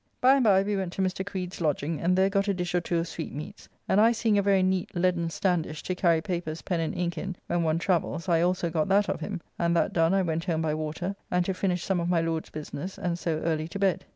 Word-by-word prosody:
By 255 +1 +6
and 275 -2 +3
by 195 -3 +5
we 205 +1 -1
went 190 -3 -2
to - - -2
Mr. 185 0 -1
Creed's 185 -3 -5
lodging, 150 0 -1
and 180 +2 +2
there 190 +1 +5
got 195 0 +1
a 200 - +1
dish 180 -1 -3
or 175 - +2
two 170 0 -1
of 165 +1 -1
sweetmeats, 160 +4 -7 0.2
and 200 - +4
I 230 +2 +5
seeing 225 -2 +1
a 200 - +4
very 195 -1 +3
neat 185 -1 0
leaden 175 -1 +1
standish 165 -3 -1
to 185 - -2
carry 170 -3 +2
papers, 170 -5 -4
pen, 175 -3 -1
and 165 - -2
ink 175 -1 -1
in 190 -1 -4
when 175 - 0
one 160 -1 +1
travels 170 -1 -1
I 165 -2 +3
also 175 -1 +1
got 160 +1 0
that 200 +1 +3
of - - -1
him, 195 -4 -5 0.2
and 170 0 +2
that 170 - +1
done 165 +2 +3
I 195 - +3
went 165 -1 -2
home 160 -3 0
by 155 -1 0
water 155 +5 -3
and 180 0 +1
to 190 - 0
finish 180 -2 -1
some 190 -2 0
of 170 0 -1
my 175 -2 +3
Lord's 165 -1 -2
business, 155 +4 -6
and 175 -1 -2
so 160 -3 -1
early 160 -1 -1
to 170 - -6
bed. 190 -2 +1
175 Hz, 265 wpm, -27 LUFS, 165-190 Hz, 0.2 s, By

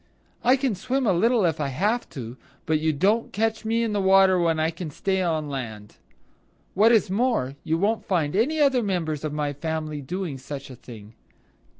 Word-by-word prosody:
I 250 +2 +5
can 265 -3 0
swim 255 +8 -2
a 200 - +3
little 225 +3 +3
if 160 -2 0
I 145 - 0
have 210 - -1
to, 120 -5 -7 0.3
but 160 -1 +1
you 160 +1 +1
don't 200 +10 +1
catch 220 +2 -1
me 230 +1 +1
in 225 -2 -1
the 205 - 0
water 190 -1 +5
when 165 -2 +1
I 160 +1 +1
can 170 0 -6
stay 190 +6 -1
on 160 -4 -1
land. 110 -7 -7 0.8
What 215 +4 +5
is 215 -5 +3
more, 200 - 0
you 160 +1 0
won't 210 +5 0
find 165 -4 0
any 285 +10 +1
other 270 -4 +3
members 165 -8 -2
of 155 - -2
my 150 -1 -2
family 155 0 -4
doing 165 -1 -4
such 135 +1 -8
a - - -9
thing." 115 -3 -12
175 Hz, 200 wpm, -24 LUFS, 150-220 Hz, 0.8 s, I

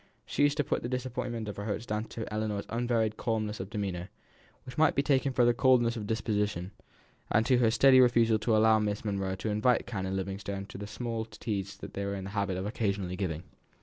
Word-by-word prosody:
She - - -2
used 145 0 +4
to 145 - +2
put - - -1
the 120 - -4
disappointment 125 -3 -3
of 105 - -6
her 100 - -4
hopes 110 +1 -3
down 110 -1 -2
to 115 -1 -6
Ellinor's 105 -1 -2
unvaried 115 -2 0
calmness 110 -2 -2
of 95 +1 -5
demeanour, 95 -4 -3 0.6
which 125 - -9
might 155 0 +4
be 140 - +2
taken 140 -1 +2
for 120 -2 +4
coldness 120 -2 +4
of 105 -3 -5
disposition; 105 -4 -1 0.6
and 110 +1 +3
to 125 -1 +4
her 115 -2 +4
steady 130 +3 +6
refusal 115 -3 +4
to 110 +1 +2
allow 110 0 +5
Miss 105 0 -2
Monro 95 -2 -1
to 95 +3 -4
invite 110 +4 +2
Canon 95 -4 -3
Livingstone 95 +1 -4
to 95 - -8
the 105 - -6
small 115 +1 -3
teas 100 -2 -4
they 100 - -6
were 100 0 -2
in 95 - -5
the 95 - -6
habit 100 -3 -1
of 95 - -3
occasionally 100 -4 -1
giving. 90 -4 -3
110 Hz, 215 wpm, -30 LUFS, 100-120 Hz, 0.6 s, steady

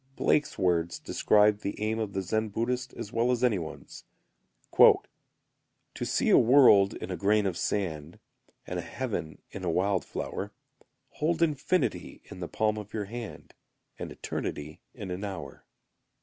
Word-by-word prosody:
Blake's 150 - +1
words 85 -2 +1
describe 105 0 +3
the 100 - -5
aim 110 +1 -1
of 105 -3 -3
the 95 -1 -2
Zen 110 +4 -1
Buddhist 125 +4 -2
as 115 -3 -7
well 115 +2 +2
as 125 -1 +1
any 115 -6 +3
one's: 80 -2 -9 0.8
"To - - +1
see - - +1
a - - +8
World 115 -6 +6
in - - -6
a - - -2
grain 105 +4 +2
of 95 -3 -1
sand, 85 -5 -2 0.5
And - - -4
a - - -2
Heaven 100 - -5
in 100 - -7
a 90 - 0
wild 95 +3 +1
flower; - - -5 0.6
Hold 165 +2 0
infinity 155 +3 -1
in - - -11
the 85 - -5
palm 110 0 0
of 105 +1 -9
your 105 -2 -2
hand, 115 +2 -8 0.5
And - - -5
Eternity 75 +2 -5
in 100 -6 -6
an 90 +3 -4
hour." 95 -4 -7
105 Hz, 160 wpm, -28 LUFS, 90-115 Hz, 0.8 s, a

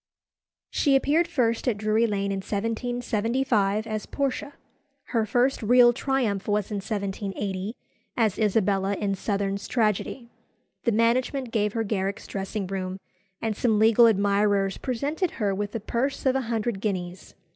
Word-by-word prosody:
She 280 -3 +3
appeared 305 +5 +3
first 245 -7 0
at 230 -4 +1
Drury 215 +2 +2
Lane 200 -2 -1
in 195 - -1
1775 225 0 0
as 215 -2 -4
Portia. 280 +1 -2 0.6
Her 225 -3 0
first 250 +6 +2
real 240 +2 +6
triumph 245 -7 -1
was 210 0 0
in 205 - -1
1780, 200 0 -3 0.4
as 220 -5 +1
Isabella 200 -2 +2
in 200 0 -1
Southerne's 200 0 -2
tragedy. 230 +2 0 0.6
The 235 - +3
management 240 +3 +1
gave 210 -2 0
her 225 - 0
Garrick's 200 -2 -2
dressing 195 +1 -4
room, 185 0 -4 0.5
and 220 -2 0
some 220 -1 +2
legal 225 +2 +6
admirers 200 -1 +2
presented 285 +8 -2
her 205 -4 +1
with 205 +2 -3
a - - -1
purse 245 +7 -2
of 260 0 +3
a 270 - +1
hundred 225 -3 -1
guineas. 185 -3 -4
215 Hz, 145 wpm, -26 LUFS, 200-240 Hz, 0.6 s, real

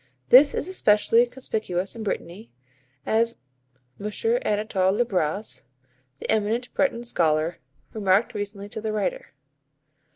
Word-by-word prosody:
This 280 +3 +7
is - - -2
especially 230 - +3
conspicuous 215 -7 -3
in 230 - -7
Brittany, 205 0 -5 0.6
as 230 +1 +1 0.6
M. 205 - -4 0.3
Anatol 205 - +1
Le 240 - +2
Braz, 190 0 -2 0.6
the - - -6
eminent 220 +3 0
Breton 240 -4 0
scholar, 165 -7 +1 0.3
remarked 200 0 +2
recently 205 -1 -5
to 220 - -6
the 220 0 -2
writer. - - -2
215 Hz, 120 wpm, -25 LUFS, 195-235 Hz, 0.6 s, This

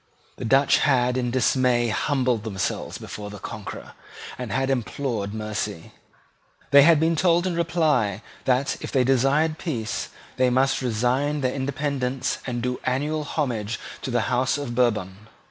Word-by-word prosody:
The - - -5
Dutch 135 +4 +4
had 125 -3 +2
in 125 -1 0
dismay 125 -1 +2
humbled 125 -1 0
themselves 100 -4 -3
before 105 -1 -7
the 105 - -8
conqueror, 100 +1 -8 0.4
and 125 -3 -6
had 135 +1 0
implored 120 -4 -2
mercy. 105 -4 -4 0.8
They 140 - +9
had 160 +1 +6
been 165 +1 +2
told 175 +1 +3
in 185 - 0
reply 155 - +1 0.2
that, 130 +2 +1
if - - -5
they 130 -2 +3
desired 135 +5 +2
peace, 115 -10 -3 0.3
they 130 0 +3
must 130 +2 +2
resign 130 +5 0
their 130 -1 0
independence 135 -1 -2
and 120 -2 -3
do 125 0 -2
annual 150 +4 -1
homage 115 -8 -2 0.2
to - - -4
the 120 -1 +1
House 130 +3 +1
of 140 -4 -4
Bourbon. 105 -4 0
130 Hz, 150 wpm, -24 LUFS, 115-140 Hz, 0.8 s, They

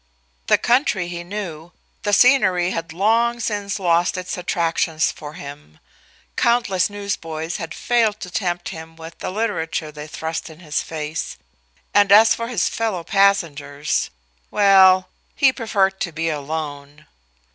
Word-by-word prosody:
The - - +5
country 235 - +1
he 175 0 -5
knew; 175 -4 -7 0.3
the 205 - -1
scenery 190 -7 +4
had 165 -2 -4
long 230 +7 +2
since 205 -2 -2
lost 175 0 +1
its 180 0 -4
attractions 165 -2 0
for 150 -1 -10
him; 140 - -11 0.6
countless 220 -6 +2
newsboys 170 -5 -4
had 165 -1 -6
failed 225 -3 +1
to 180 - -7
tempt 175 -2 -2
him 160 0 -9
with 165 0 -11
the - - -4
literature 185 -7 -2
they 150 0 -9
thrust 160 +2 -5
in 160 0 -13
his 150 -3 -2
face, 155 0 -5 0.6
and 205 -1 +4
as 220 +2 +8
for 230 - -4
his 235 -7 0
fellow 220 -7 -2
passengers 155 -8 +1 0.4
well, 190 -2 +5 0.3
he 270 -2 +4
preferred 195 -6 0
to 175 - -1
be 165 +1 -2
alone. 145 -1 -5
180 Hz, 140 wpm, -21 LUFS, 160-205 Hz, 0.6 s, as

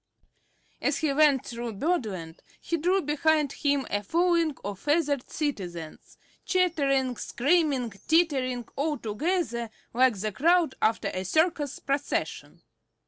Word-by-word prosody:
As - - +1
he 310 -4 0
went 290 -3 +4
through 235 -1 -5
Birdland 200 - -2 0.2
he 335 - -2
drew 360 +4 +1
behind 300 0 +2
him 285 -2 0
a 205 - 0
following 335 - +1
of 200 -1 -5
feathered 290 -3 0
citizens, 175 - -5 0.3
chattering, 280 -9 +1
screaming, 280 -3 +1 0.2
tittering 265 -7 +2
all 295 +1 -1
together 235 - -2 0.2
like 245 -3 +3
the 215 +2 -2
crowd 330 - +3
after 215 -2 +1
a 185 -1 -4
circus 305 - +1
procession. 280 +1 -3
280 Hz, 120 wpm, -27 LUFS, 235-320 Hz, 0.3 s, went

